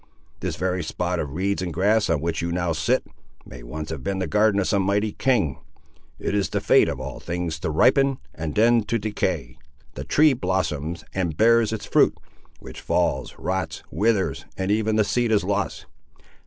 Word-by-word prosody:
This - - -3
very 90 0 -1
spot 90 +2 -2
of 75 -2 -4
reeds 100 +2 0
and 90 -2 -3
grass, 100 +5 +2
on 80 -4 +1
which 85 0 -2
you 85 0 -2
now 85 0 0
sit, 80 0 +1 0.4
may 65 - -11
once 75 +6 -6
have 70 -5 -5
been 95 +6 -2
the 95 - -1
garden 105 -1 +2
of 95 - 0
some 100 -2 +2
mighty 100 +2 +1
king. 115 - 0 0.6
It - - -3
is 100 -1 +1
the - - -1
fate - - +4
of - - -4
all 65 -1 -6
things 85 -2 -3
to 80 - -2
ripen, 135 - +3 0.2
and 80 -1 -5
then 115 +2 +4
to 115 - 0
decay. 105 - -3 0.3
The 65 - -6
tree 150 - +4
blossoms, 85 - -2
and 85 -5 -2
bears 115 0 +4
its 105 -2 -4
fruit, - - +3 0.4
which - - -10
falls, - - 0
rots, 95 +1 -3
withers, 105 +3 0
and 95 +1 -1
even 110 0 +1
the 110 - +4
seed 120 +2 0
is 105 -3 +3
lost! 100 +2 -2
95 Hz, 190 wpm, -24 LUFS, 80-110 Hz, 0.6 s, fate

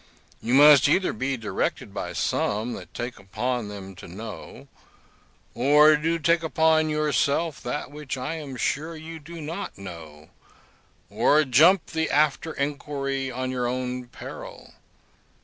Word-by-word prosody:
You 120 +3 +1
must 145 -1 +8
either 185 +5 +2
be 130 +4 -2
directed 110 -2 -3
by - - -4
some 110 +4 -1
that - - -9
take 120 -2 -6
upon 110 +4 -3
them 100 -2 -8
to - - -10
know, 105 +4 -9 0.9
or 150 +4 +6
to 165 +3 0
take 165 +2 +2
upon 160 -1 +2
yourself 150 +1 0
that 145 - -4
which 145 -2 -6
I 130 +5 -3
am 150 -5 -6
sure 155 +7 -2
you 160 +1 -8
do 165 +3 -10
not 165 +6 -6
know, 80 -5 -10 0.8
or 155 +1 +4
jump 155 +8 +5
the 160 0 -1
after 155 +2 +1
inquiry 140 -1 -3
on 130 +1 -3
your 125 -1 -1
own 125 0 -3
peril. - - -10
140 Hz, 140 wpm, -25 LUFS, 125-155 Hz, 0.9 s, must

